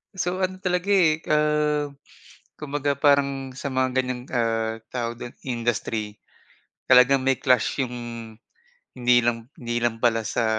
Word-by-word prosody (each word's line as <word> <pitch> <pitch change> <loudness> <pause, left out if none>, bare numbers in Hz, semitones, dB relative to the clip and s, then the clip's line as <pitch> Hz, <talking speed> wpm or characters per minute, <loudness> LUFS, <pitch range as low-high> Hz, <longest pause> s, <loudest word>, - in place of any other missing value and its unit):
So 185 +1 -1
ano 185 0 -2
talaga 180 +1 -1
eh, 165 -5 +3
ah, 150 -1 +2 0.7
kumbaga 145 -1 -2
parang 140 -1 +2
sa 130 +2 -7
mga 130 -1 +1
ganyang, 125 -1 -1
ah, 115 -2 0
tawag 120 -1 -4
dun, 120 - -8
industry, 115 -3 -2 0.7
talagang 130 +1 +5
may 135 -1 +1
clash 125 0 +2
yung 125 -2 -2 1.0
hindi 125 -1 +3
lang 115 +1 -1
hindi 120 -1 -3
lang 120 -1 0
pala 115 -1 +2
sa, 115 +1 -1
130 Hz, 135 wpm, -24 LUFS, 120-150 Hz, 1.0 s, talagang